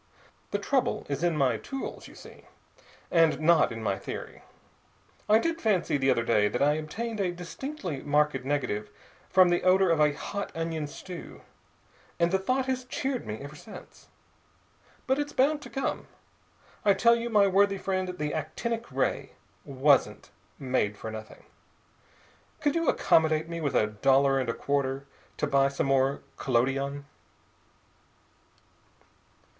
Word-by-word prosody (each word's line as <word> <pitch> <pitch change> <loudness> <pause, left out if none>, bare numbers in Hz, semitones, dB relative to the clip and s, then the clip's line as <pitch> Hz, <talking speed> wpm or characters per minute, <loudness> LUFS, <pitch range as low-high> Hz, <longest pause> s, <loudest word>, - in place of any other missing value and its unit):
The - - -1
trouble 265 -3 0
is 140 +3 -2
in 170 -3 +1
my 130 -5 +2
tools, 270 - -6
you - - -15
see, - - -14 0.7
and 165 -3 +4
not 165 -2 +4
in 115 -1 -6
my 100 -2 -1
theory. - - -7 0.9
I 215 - +7
did 330 +7 -1
fancy 185 -8 +1
the 135 -1 +1
other 120 -3 +2
day 105 -3 +3
that 125 - -2
I 145 +1 +4
obtained 215 +9 -4
a 185 -3 +1
distinctly 180 - -6
marked 150 -2 +1
negative 125 -7 -2 0.4
from 185 -1 +6
the 175 - +2
odor 185 0 +4
of 165 - +2
a 150 -1 +5
hot 200 +7 -5
onion 165 -2 -3
stew, 175 +4 -9 0.8
and 170 0 +2
the 190 - +2
thought 255 +7 0
has 260 -1 -2
cheered 260 0 -3
me 105 - -3
ever 145 +2 -9
since. 205 +8 -13 1.0
But 265 +2 +1
it's 290 0 -3
bound 290 +3 +2
to - - -10
come. 270 - -3 0.8
I 200 -2 +4
tell 235 +4 +5
you, 235 0 -3
my 210 -3 +5
worthy 200 +1 +3
friend, 185 -1 -2
the 150 -2 -2
actinic 225 +10 -4
ray - - -1 0.3
wasn't 140 0 +2 0.3
made 125 -6 -1
for 110 - -6
nothing. 110 0 -10 1.2
Could 290 -1 +1
you 335 -2 +1
accommodate 160 0 +3
me 170 0 -5
with 145 -3 -1
a - - +4
dollar 135 +6 +3
and 130 -3 -2
a - - 0
quarter 140 -1 -1 0.3
to - - 0
buy 135 0 +3
some 140 - -2
more 135 0 +1
collodion?" 135 +3 0
155 Hz, 150 wpm, -28 LUFS, 135-200 Hz, 1.2 s, I